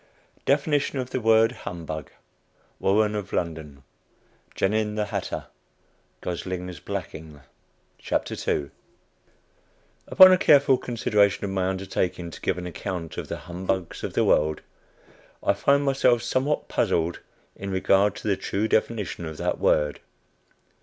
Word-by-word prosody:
DEFINITION 145 0 +1
OF 130 -1 -4
THE 130 - -1
WORD 115 0 +4
HUMBUG. 80 - -6 0.7
WARREN 105 +2 +2
OF 100 -2 -4
LONDON. 80 -5 -4 0.7
GENIN, 105 +1 0
THE 105 -1 0
HATTER. 105 - -4 0.8
GOSLING'S 90 -1 -5
BLACKING. 75 -2 -7 2.7
Upon 185 0 +9
a 185 - +6
careful 140 -5 +5
consideration 105 -5 +1
of 100 - -3
my 95 -1 0
undertaking 95 -2 -2
to - - -11
give - - 0
an 90 - -5
account 90 -1 -5
of - - -6
the - - -4
"Humbugs 90 0 -3
of - - -4
the - - +2
World," 75 0 +2 0.8
I - - +3
find 140 0 +2
myself 130 -4 +2
somewhat 130 +5 0
puzzled 85 +1 0 0.4
in 100 - -6
regard 95 +1 +2
to - - -7
the 100 - +3
true 100 +3 -2
definition 105 -6 -1
of 80 -1 -7
that - - -2
word. 75 -1 +2
95 Hz, 125 wpm, -25 LUFS, 85-115 Hz, 2.7 s, Upon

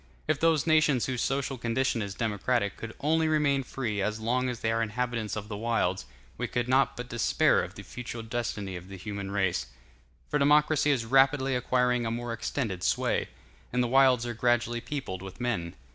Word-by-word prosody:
If 155 -2 +1
those 165 -2 +3
nations 155 -6 +3
whose 125 -2 -2
social 135 -1 -1
condition 120 0 0
is 100 -1 -4
democratic 110 -1 0
could 115 -1 -8
only 160 +2 +2
remain 150 -3 +2
free 115 -5 -3
as 105 +2 -1
long 125 +3 0
as 120 -2 -5
they 110 - +1
are 115 0 +1
inhabitants 115 -1 -2
of 105 -1 -5
the 105 - -5
wilds, 105 -4 -1 0.3
we - - -1
could 120 0 -2
not 130 +2 +2
but 125 0 -5
despair 120 -1 +3
of - - -8
the - - -9
future 120 -1 -7
destiny 110 -4 -3
of 90 +1 -8
the 95 0 -9
human 100 0 -5
race; 95 -9 0 0.6
for 150 - 0
democracy 150 +1 +4
is 130 -5 +1
rapidly 135 +2 +3
acquiring 125 -1 +1
a - - 0
more 120 +1 -3
extended 110 -4 -3
sway, - - 0 0.4
and 125 0 +1
the - - 0
wilds 130 -1 +4
are 120 - -3
gradually 120 0 +1
peopled 130 -12 -5
with 95 +2 -9
men. 105 -9 -2
120 Hz, 190 wpm, -28 LUFS, 110-135 Hz, 0.6 s, democracy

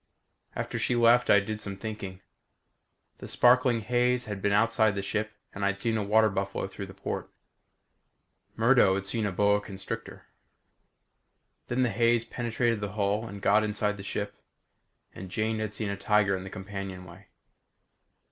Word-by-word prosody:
After - - -3
she 125 - +1
left 120 +1 +4
I 100 - +7
did 110 +2 -5
some 100 -2 -5
thinking. 100 -3 -6 1.0
The - - -8
sparkling 125 -1 +4
haze 125 +2 +1
had 105 -2 -5
been 100 - +1
outside 110 0 +3
the 100 - -3
ship 110 +2 -2 0.2
and 100 - -5
I'd 100 0 +1
seen 115 +3 -1
a 110 - 0
water 110 +2 +4
buffalo 100 0 -2
through 95 0 -7
the 95 - -12
port. - - -5 1.3
Murdo 115 -4 +4
had 100 0 -3
seen 105 +1 0
a - - -2
boa 100 +2 +2
constrictor. 95 -2 -7 1.4
Then 125 +1 +1
the 125 - +2
haze 115 0 +2
penetrated 115 -1 -1
the 100 -1 -4
hull 105 +2 0
and 100 -2 -9
got 105 +2 +4
inside 105 -1 -1
the - - -7
ship. 100 - -4 0.8
And 95 +1 -9
Jane 110 +3 -1
had 110 -1 -2
seen 105 -2 -2
a - - -2
tiger 100 -1 +2
in 95 - -5
the - - -7
companionway. 95 -2 -8
105 Hz, 165 wpm, -28 LUFS, 100-115 Hz, 1.4 s, I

